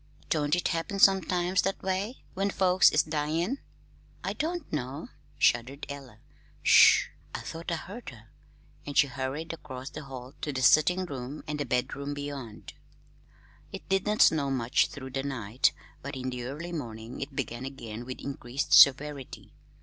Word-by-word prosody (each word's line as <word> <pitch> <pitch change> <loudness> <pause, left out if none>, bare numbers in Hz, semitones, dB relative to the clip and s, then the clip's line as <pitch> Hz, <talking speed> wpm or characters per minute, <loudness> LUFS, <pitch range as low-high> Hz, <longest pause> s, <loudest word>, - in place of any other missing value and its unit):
Don't 150 +1 +2
it 180 - 0
happen 170 +3 -2
sometimes 185 -2 +4
that 195 +1 -2
way 195 +6 -2
when 195 +1 0
folks 185 -2 +5
is 155 - +3
dyin'?" 160 - -1 0.6
"I - - -2
don't 335 - -3
know," 135 -1 -4 0.3
shuddered 125 +5 +1
Ella. 135 -6 -9 0.5
"Sh - - +7
h! - - -15 0.2
I - - -4
thought 165 +1 -6
I - - +1
heard 200 +9 -8
her." 115 -3 -15 0.5
And 145 - -5
she 145 - +7
hurried 140 +4 -4
across 135 -4 -8
the 150 -1 -8
hall 130 -1 -9
to 150 - -2
the 130 -2 -2
sitting 160 +8 +5
room 135 -2 -6
and 150 -1 -3
the 145 - -2
bedroom 140 +4 -2
beyond. 140 -6 -7 1.0
It - - -8
did 195 +1 +1
not 210 +1 +5
snow 145 -3 +3
much 125 -2 +2
through 130 -2 -9
the 135 +1 -2
night, 125 -4 0 0.3
but 140 +1 -6
in 130 0 -3
the 125 -1 -5
early 155 +7 -6
morning 115 -6 -6
it 135 0 -6
began 120 -2 -3
again 120 -4 -7
with 130 +1 -7
increased 135 -1 -3
severity. 140 0 +5
140 Hz, 165 wpm, -28 LUFS, 130-170 Hz, 1.0 s, Sh